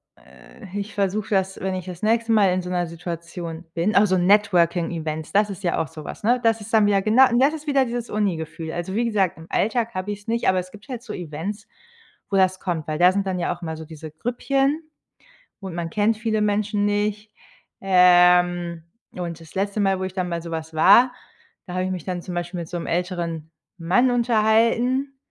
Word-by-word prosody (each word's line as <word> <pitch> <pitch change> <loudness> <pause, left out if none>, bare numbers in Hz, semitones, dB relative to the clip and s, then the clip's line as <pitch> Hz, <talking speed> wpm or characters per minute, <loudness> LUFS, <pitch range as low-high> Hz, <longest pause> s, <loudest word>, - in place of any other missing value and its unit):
äh, 205 -4 -13
ich 205 +1 -5
versuche 200 +1 -1
das, 190 -2 0
wenn 190 0 -2
ich 185 -1 -4
das 180 -2 -8
nächste 225 +1 +2
Mal 205 -3 +5
in 185 0 0
so 180 - -7
'ner 175 -1 0
Situation 170 0 -7
bin 175 +6 0
auch 205 - +6
so 185 0 +2
Networking-Events, 170 -5 +1
das 205 +1 +3
ist 195 0 -8
ja 175 - 0
auch 160 - -3
so 155 +3 -10
was, - - -9
ne? 245 +2 +2
Das 225 0 +3
ist 215 +2 -10
dann 215 -2 +5
wieder 200 -1 +3
genau 225 +6 +6
das 275 +4 +4
ist 310 -1 -7
wieder 275 -3 +2
dieses 240 0 -4
Uni-Gefühl. 165 -5 -3
Also, 175 +2 -4
wie 235 +3 +1
gesagt, 200 -7 0
im 165 +1 -12
Alltag 230 +2 0
habe 185 +2 -3
ich's 205 +1 -8
nicht, 230 -2 +1
aber 185 -1 +2
es 185 0 -7
gibt 210 +6 -15
halt 245 -3 -5
so 230 -3 -8
Events, 180 +5 -6 0.6
wo 200 - -1
das 185 -1 +3
kommt. 165 -4 -3
Weil 155 +1 -2
da 180 +1 +6
sind 200 0 -1
dann 185 -1 -2
ja 175 - -1
auch 175 - -19
immer 160 -1 -5
so 160 - -8
diese 155 -1 -10
Grüppchen 270 - 0 0.8
und 190 -3 -6
man 170 -1 -3
kennt 210 +4 +1
viele 220 -1 -1
Menschen 205 0 0
nicht. 210 +1 -1 0.5
Ähm, 180 -2 +4 0.3
und 170 -2 -5
das 165 +2 -15
letzte 200 +2 -1
Mal, 195 -1 +2
wo - - -3
ich 185 0 -4
dann 185 -2 -2
bei 170 -1 -3
so 170 - -8
was 160 0 -5
war, 205 +10 +6 0.5
da 180 - -7
habe 185 0 0
ich 185 - -2
mich 180 -4 -4
dann 180 -2 -4
zum 180 -1 -7
Beispiel 175 0 -4
mit 165 - -6
so 180 - -7
'm 170 - -4
älteren 170 -3 -3 0.3
Mann 190 +10 +2
unterhalten, 240 +3 +2
190 Hz, 220 wpm, -23 LUFS, 175-215 Hz, 0.8 s, auch